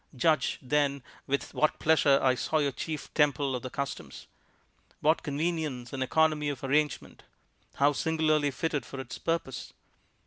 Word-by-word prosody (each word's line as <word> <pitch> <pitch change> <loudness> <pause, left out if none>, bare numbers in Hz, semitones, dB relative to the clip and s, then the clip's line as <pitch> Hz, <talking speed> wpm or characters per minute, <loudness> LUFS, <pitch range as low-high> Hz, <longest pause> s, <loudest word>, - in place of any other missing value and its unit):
Judge, 155 +1 +2
then, 140 0 +1 0.2
with 140 +1 -2
what 155 - +2
pleasure 145 -3 +4
I 130 -1 +5
saw 155 +5 -1
your 145 -2 +1
chief 155 +2 -6
temple 145 -2 +2
of 125 - -4
the 130 - -5
customs. 140 +2 -5 0.7
What 155 +2 +3
convenience 150 -5 -2
and 135 - -3
economy 150 +2 +2
of 140 -3 -5
arrangement! 150 +2 0 0.5
How 145 +1 +3
singularly 155 -1 +1
fitted 145 -1 -2
for 135 - -8
its 130 -2 -7
purpose! 165 -7 -3
145 Hz, 145 wpm, -29 LUFS, 135-155 Hz, 0.7 s, I